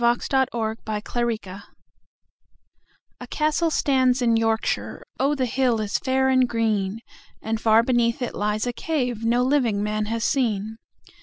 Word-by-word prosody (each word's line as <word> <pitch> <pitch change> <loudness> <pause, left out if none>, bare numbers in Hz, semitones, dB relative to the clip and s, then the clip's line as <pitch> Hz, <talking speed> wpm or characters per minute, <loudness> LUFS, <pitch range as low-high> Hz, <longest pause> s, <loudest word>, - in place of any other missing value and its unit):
The 235 0 +3
Sword 265 -1 +1
of 225 -1 -3 0.2
Arthur 235 +3 -2 1.9
A - - -9
CASTLE 310 +2 +1
stands 260 -4 +2
in 230 -1 +3
Yorkshire(Oh, 225 +5 -1
the 260 -2 0
hill 250 -1 +1
is 210 -2 -1
fair 265 0 +1
and 255 -1 +3
green!)And 220 0 -3
far 225 0 +5
beneath 235 -1 +1
it 245 - -4
lies 210 +2 -1
a 245 - -2
caveNo 245 -5 0
living 245 -7 +1
man 210 0 -1
has 230 +1 -2
seen. 220 -5 -1
235 Hz, 135 wpm, -23 LUFS, 220-260 Hz, 1.9 s, far